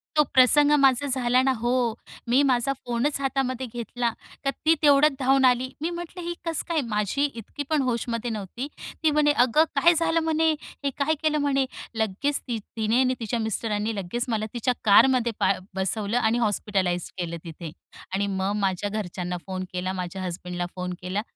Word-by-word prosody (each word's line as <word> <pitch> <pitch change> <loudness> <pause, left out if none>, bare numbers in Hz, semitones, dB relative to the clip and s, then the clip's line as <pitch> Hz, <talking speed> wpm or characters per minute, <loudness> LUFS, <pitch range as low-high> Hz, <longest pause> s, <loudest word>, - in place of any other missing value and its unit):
तो 300 - +6
प्रसंग 290 +3 +6
माझा 270 0 +4
झाला 255 -1 +2
ना. 265 - +3
हो. 240 -1 0 0.4
मी 255 +4 +5
माझा 265 0 +2
फोनच 245 +4 0
हातामध्ये 265 -1 -1
घेतला. 240 0 -2 0.3
तर - - +3 0.2
ती 320 - +6
तेवढ्यात 295 0 +6
धावून 265 0 +4
आली. 250 +1 +3
मी 330 - 0
म्हटलं 345 +1 -6
ही 345 - -2
कस 330 -2 -2
काय? 320 -3 +1
माझी 215 +3 -1
इतकी 280 +2 -6
पण 305 -3 +2
होशमध्ये 235 -1 -2
नव्हती. 220 +6 -5 0.4
ती 310 - +4
म्हणे, 295 0 +4
"अगं 255 +3 +4
काय 285 +5 +5
झालं?" 330 0 +2
म्हणे, 320 0 +2 0.3
"हे 280 - +1
काय 295 +2 +2
केलं?" 305 -1 +2
म्हणे. 275 -2 +2 0.3
लगेच 220 +7 -1
ती 240 -3 -4 0.2
तिने 220 +3 +2
आणि 255 0 +2
तिच्या 230 +1 -2
मिस्टरांनी 220 0 -2
लगेच 200 +6 -3
मला 215 -2 0
तिच्या 245 +1 0
कारमध्ये 235 +3 +5
बा - - +3 0.2
बसवलं 200 +4 -1
आणि 235 -1 +2
हॉस्पिटलाईज 195 -5 0
केलं 170 -2 -3
तिथे. 165 -1 -8 0.4
आणि 200 +1 0
मग 190 0 -1
माझ्या 195 0 -1
घरच्यांना 180 -4 -4
फोन 185 -1 -3
केला. 185 +1 -2
माझ्या 185 0 -5
हसबँडला 180 0 -4
फोन 180 0 -4
केला. 185 +3 -2
240 Hz, 175 wpm, -25 LUFS, 205-275 Hz, 0.4 s, तो